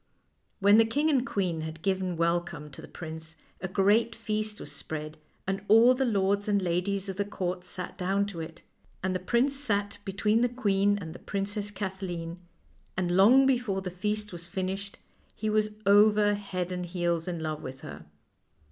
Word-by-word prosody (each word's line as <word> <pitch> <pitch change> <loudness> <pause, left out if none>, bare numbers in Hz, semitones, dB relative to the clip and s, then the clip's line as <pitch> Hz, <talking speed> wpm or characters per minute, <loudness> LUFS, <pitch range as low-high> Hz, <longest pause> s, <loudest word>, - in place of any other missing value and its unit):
When 205 +2 +6
the 225 - +6
king 290 +8 +1
and 265 -4 +3
queen 180 -5 -1
had 160 0 -7
given 190 -3 0
welcome 170 -2 -1
to - - -10
the - - -10
prince 160 -1 -8 0.3
a 190 - -2
great 210 +5 +3
feast 215 -1 -2
was - - -7
spread, 155 0 -6 0.3
and 195 +1 -2
all 230 +3 +7
the 265 +1 0
lords 200 -2 +1
and 205 -1 +3
ladies 190 +2 -1
of 190 -1 -5
the 205 - +1
court 180 -3 -3
sat 180 +1 -5
down 195 +2 +1
to 200 -4 -6
it, 165 +1 -8 0.4
and 190 0 0
the 185 - -1
prince 240 +9 +1
sat 205 -7 -1
between 210 +3 +1
the 245 - +3
queen 205 -4 +2
and 165 -5 -7
the - - -10
Princess 205 +1 -3
Kathleen, 185 -4 -5 0.6
and 175 -1 0
long 240 +8 +7
before 240 -8 +1
the 180 - -4
feast 210 +3 -2
was 170 -1 -7
finished 195 +2 -4 0.4
he 215 0 -2
was 215 0 +2 0.2
over 205 +1 +6
head 185 -3 -3
and 180 0 -5
ears 170 -1 0
in 175 -2 -3
love 155 -1 -3
with 130 0 -8
her. 75 +1 -9
195 Hz, 185 wpm, -28 LUFS, 175-210 Hz, 0.6 s, all